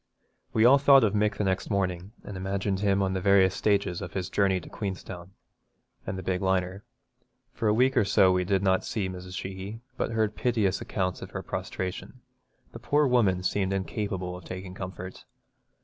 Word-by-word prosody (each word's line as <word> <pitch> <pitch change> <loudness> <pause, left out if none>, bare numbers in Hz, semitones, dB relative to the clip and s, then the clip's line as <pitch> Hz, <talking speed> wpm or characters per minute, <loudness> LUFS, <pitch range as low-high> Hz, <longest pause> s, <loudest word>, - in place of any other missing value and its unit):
We 110 - +3
all 135 +3 +7
thought 140 -2 +7
of 105 -2 +2
Mick 105 0 +1
the - - 0
next 95 -1 -1
morning, 95 -2 -1
and 100 - -8
imagined 95 +1 -2
him 100 -1 +2
on 95 0 0
the 95 - -2
various 95 -1 +4
stages 100 -4 0
of 90 - -7
his 95 -2 -3
journey 95 -2 +2
to - - -13
Queenstown, 95 -2 -6 0.7
and - - -3
the 95 - -6
big 90 0 -1
liner. 95 +1 0 0.7
For 110 - -2
a 105 - +4
week 130 +3 +3
or 120 - +4
so 95 -1 +4
we 90 0 +2
did 95 +1 0
not 95 -1 +2
see 105 -4 -2
Mrs. 90 0 -7
Sheehy, 95 +4 -6 0.2
but - - -1
heard 110 -1 0
piteous 105 -6 0
accounts 95 -2 -2
of - - -7
her - - -6
prostration. 95 +7 -5 0.5
The 115 - -9
poor 145 +5 +2
woman 105 -8 +2
seemed 95 +1 0
incapable 95 -2 -3
of 90 - -10
taking 90 +1 -7
comfort. 95 0 -8
95 Hz, 190 wpm, -27 LUFS, 95-105 Hz, 0.7 s, all